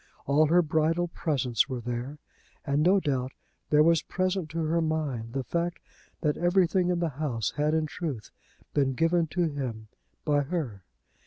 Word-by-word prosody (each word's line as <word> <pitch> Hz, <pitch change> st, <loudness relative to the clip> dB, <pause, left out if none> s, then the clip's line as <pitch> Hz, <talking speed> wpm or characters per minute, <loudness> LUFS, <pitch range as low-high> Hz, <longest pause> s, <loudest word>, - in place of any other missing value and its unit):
All 150 Hz, +3 st, +4 dB
her 175 Hz, +3 st, +4 dB
bridal 160 Hz, +3 st, +1 dB
presents 140 Hz, -4 st, 0 dB
were 130 Hz, -2 st, -3 dB
there; 120 Hz, +4 st, -4 dB, 0.5 s
and 140 Hz, +1 st, +1 dB
no 185 Hz, +5 st, +5 dB
doubt 135 Hz, -6 st, -1 dB, 0.4 s
there 150 Hz, 0 st, +5 dB
was 165 Hz, -1 st, +4 dB
present 185 Hz, -2 st, -1 dB
to 165 Hz, +1 st, -2 dB
her 165 Hz, +2 st, +1 dB
mind 145 Hz, -8 st, -2 dB
the 135 Hz, -, -1 dB
fact 170 Hz, +5 st, -2 dB, 0.4 s
that 150 Hz, -2 st, +1 dB
everything 180 Hz, 0 st, +2 dB
in 180 Hz, -, +1 dB
the 170 Hz, -1 st, 0 dB
house 120 Hz, -8 st, -1 dB
had 150 Hz, +1 st, +1 dB
in 160 Hz, -1 st, +1 dB
truth 145 Hz, -, -5 dB, 0.4 s
been 135 Hz, -2 st, +2 dB
given 165 Hz, +2 st, +2 dB
to 175 Hz, +3 st, 0 dB
him 130 Hz, -9 st, -3 dB, 0.4 s
by 145 Hz, -1 st, +3 dB
her. 140 Hz, -, -3 dB
155 Hz, 165 wpm, -28 LUFS, 135-170 Hz, 0.5 s, no